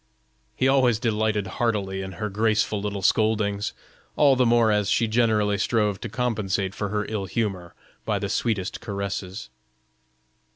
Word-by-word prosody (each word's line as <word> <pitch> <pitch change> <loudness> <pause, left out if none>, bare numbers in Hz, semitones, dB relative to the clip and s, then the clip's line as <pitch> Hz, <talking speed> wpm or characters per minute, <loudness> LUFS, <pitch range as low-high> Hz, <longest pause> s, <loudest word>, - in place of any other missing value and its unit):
He 130 - +2
always 130 -4 +4
delighted 110 -3 0 0.2
heartily 100 -5 0
in 95 0 -6
her 105 - -3
graceful 105 0 +1
little 100 -1 -4
scoldings, 105 0 +1 0.4
all 140 -3 +5
the 125 -1 +3
more 115 -1 +4
as 105 -1 +1
she 115 - +2
generally 110 -3 +2
strove 105 -2 0
to 120 - -5
compensate 105 -5 -1
for 105 -1 -3
her 105 +1 -1
ill 105 -3 -3
humor 95 -4 -3 0.3
by - - 0
the - - -2
sweetest 105 -5 -1
caresses. 100 - -5
105 Hz, 150 wpm, -24 LUFS, 100-115 Hz, 0.4 s, all